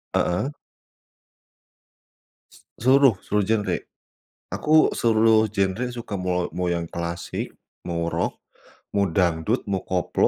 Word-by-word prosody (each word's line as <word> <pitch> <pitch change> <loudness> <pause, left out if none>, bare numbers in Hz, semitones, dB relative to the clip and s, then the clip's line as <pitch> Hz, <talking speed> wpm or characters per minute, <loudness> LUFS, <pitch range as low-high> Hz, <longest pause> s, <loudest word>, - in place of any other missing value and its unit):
Heeh. 90 +11 +1 2.0
S - - -16 0.3
seluruh, 135 -3 +6
seluruh 105 -1 0
genre. 105 -5 +1 0.8
Aku 155 - 0 0.3
seluruh 110 -1 +4
genre 100 +5 +1
suka, 115 -3 -6
mau 90 -1 -1
mau 90 -1 -1
yang 85 -1 -1
klasik, 85 0 -4 0.4
mau 85 -1 -1
rock, - - -1 0.6
mau 100 -1 +3
dangdut, 85 +6 +1
mau 95 - 0
koplo, 90 -2 +1
95 Hz, 110 wpm, -24 LUFS, 85-110 Hz, 2.0 s, seluruh